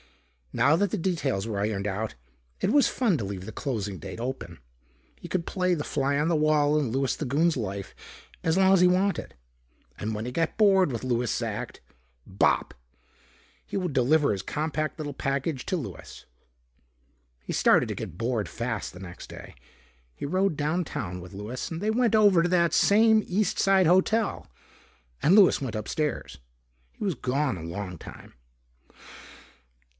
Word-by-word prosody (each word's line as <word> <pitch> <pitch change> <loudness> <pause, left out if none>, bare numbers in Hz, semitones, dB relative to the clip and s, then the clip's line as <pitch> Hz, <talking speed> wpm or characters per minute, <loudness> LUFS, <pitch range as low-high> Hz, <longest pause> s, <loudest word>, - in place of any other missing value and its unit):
Now 145 +3 +3
that 200 +2 +1
the - - -1
details 145 - -1
were 100 -3 -2
ironed 105 -1 -1
out, 105 +3 -3 0.4
it - - +1
was 285 0 +5
fun 225 -10 +1
to - - -3
leave 95 -1 -5
the 110 - -7
closing 105 - -3
date - - -8
open. 120 -9 -5 0.6
He - - -9
could 175 -3 -1
play 180 -1 0
the 150 - -3
fly 140 -1 0
on 150 +2 +1
the 170 - +2
wall 150 -1 +3
in 140 -7 0
Louis 135 +1 0
the - - -5
Goon's 155 +5 +2
life 100 -5 -5 0.5
as 165 +2 +1
long 190 0 +5
as 190 - +5
he 180 - +7
wanted. 185 +2 0 0.6
And 110 +1 -3
when 105 +1 -4
he 125 - -4
got 165 +4 -1
bored 195 -7 +4
with 120 +1 -4
Louis's 120 -1 0
act 110 -3 -4 0.5
bop! 95 - +1 0.9
he - - -4
would 180 -5 -2
deliver 140 +4 +3
his 100 -2 -2
compact 155 +6 -3
little 145 -2 -5
package 135 +1 -2
to 185 - 0
Louis.... 150 - -8 1.2
He - - -5
started - - +4
to - - -4
get 85 - -7
bored 115 -1 -1
fast 115 -3 -4
the 90 - -12
next 90 -2 -9
day. - - -11 0.6
He - - -6
rode 185 +1 0
downtown 145 - -2
with 90 - -11
Louis 105 +6 -5
and 165 - -4
they 210 +3 0
went 230 -1 +2
over 200 -6 +5
to 175 - +1
that 170 -2 +2
same 220 +1 +5
East 200 +3 0
side 195 -1 +4
hotel 190 +6 +2 0.7
and 175 - +5
Louis 200 -8 +6
went 125 -5 -4
upstairs. 150 +8 -3 0.5
He - - -6
was 190 -5 0
gone 130 +1 -1
a 85 - -8
long 90 0 -6
time. - - -12
145 Hz, 170 wpm, -27 LUFS, 110-180 Hz, 1.2 s, he